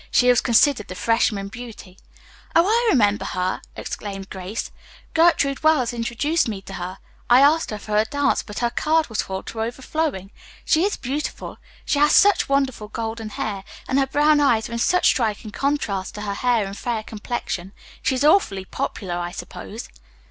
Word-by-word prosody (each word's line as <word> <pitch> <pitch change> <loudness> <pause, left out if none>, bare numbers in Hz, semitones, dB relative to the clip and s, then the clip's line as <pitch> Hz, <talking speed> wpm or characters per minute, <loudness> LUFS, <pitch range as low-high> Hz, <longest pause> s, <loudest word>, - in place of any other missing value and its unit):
She 250 - +4
was 245 -2 +5
considered 240 -1 +3
the 185 - -7
freshman 215 -2 +1
beauty. 220 -5 -10 0.6
"Oh, 335 +1 +6
I 465 +4 +2
remember 205 - +3
her!" 185 0 -2
exclaimed 195 -2 -6
Grace. 190 +3 -5 0.4
"Gertrude 320 -4 +3
Wells 300 -7 +3
introduced 240 +8 0
me 210 -3 -3
to 195 - -10
her. 185 0 -5 0.3
I 245 +2 +7
asked 305 +3 +4
for 210 0 -3
a 215 - +5
dance, 285 +5 +1
but 210 - -10
her 240 -1 0
card 315 +3 +1
was 220 - -1
full 190 0 -5
to 225 - -6
overflowing. 245 - -3 0.3
She 325 +3 +3
is 405 - -1
beautiful. 280 +4 -4 0.3
She 285 - +1
has 295 +1 +5
such 405 -6 +5
wonderful 270 -6 0
golden 225 0 -5
hair, 200 -2 -4 0.2
and 265 - +2
her 270 - +2
brown 295 +2 +3
eyes 235 -6 +3
are - - -7
in 235 - -2
such 360 +9 +2
striking 215 -3 +1
contrast 220 -9 -2
to 210 - -6
her 205 -1 -3
hair 235 0 +1
and 195 0 -6
fair 225 0 -3
complexion. 210 -4 -5 0.3
She 265 - +1
is 255 - -1
awfully 255 - +3
popular, 180 -1 -4
I 175 0 -3
suppose." 120 - -8
235 Hz, 175 wpm, -22 LUFS, 205-285 Hz, 0.6 s, I